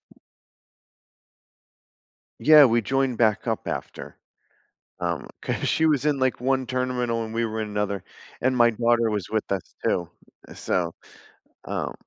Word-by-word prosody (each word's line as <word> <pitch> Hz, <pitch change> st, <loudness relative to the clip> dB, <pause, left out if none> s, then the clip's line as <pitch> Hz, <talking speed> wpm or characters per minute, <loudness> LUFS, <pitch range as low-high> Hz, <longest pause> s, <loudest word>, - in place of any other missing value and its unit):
W -, -, -28 dB, 2.2 s
Yeah, 155 Hz, -1 st, +8 dB
we 120 Hz, -1 st, +3 dB
joined 130 Hz, +1 st, 0 dB
back 110 Hz, 0 st, +2 dB
up 110 Hz, -, -2 dB
after. -, -, -6 dB, 0.9 s
Um, -, -, -2 dB
'cause -, -, -2 dB
she 160 Hz, -, +2 dB
was 150 Hz, -2 st, +2 dB
in, 150 Hz, -2 st, +2 dB
like, 130 Hz, -1 st, +1 dB
1 130 Hz, 0 st, +1 dB
terminal 125 Hz, -2 st, -1 dB
and 110 Hz, -, -8 dB
we 115 Hz, 0 st, 0 dB
were 110 Hz, 0 st, -3 dB
in 110 Hz, -, -3 dB
another, 105 Hz, -2 st, -2 dB, 0.4 s
and 130 Hz, 0 st, +2 dB
my 120 Hz, -1 st, +5 dB
daughter 115 Hz, 0 st, +2 dB
was 105 Hz, -4 st, -3 dB
with 110 Hz, -1 st, -2 dB
us, 95 Hz, -3 st, -4 dB
too, 85 Hz, -1 st, 0 dB, 0.4 s
so, 85 Hz, -2 st, -1 dB, 0.7 s
um -, -, -3 dB
120 Hz, 145 wpm, -24 LUFS, 110-130 Hz, 2.2 s, Yeah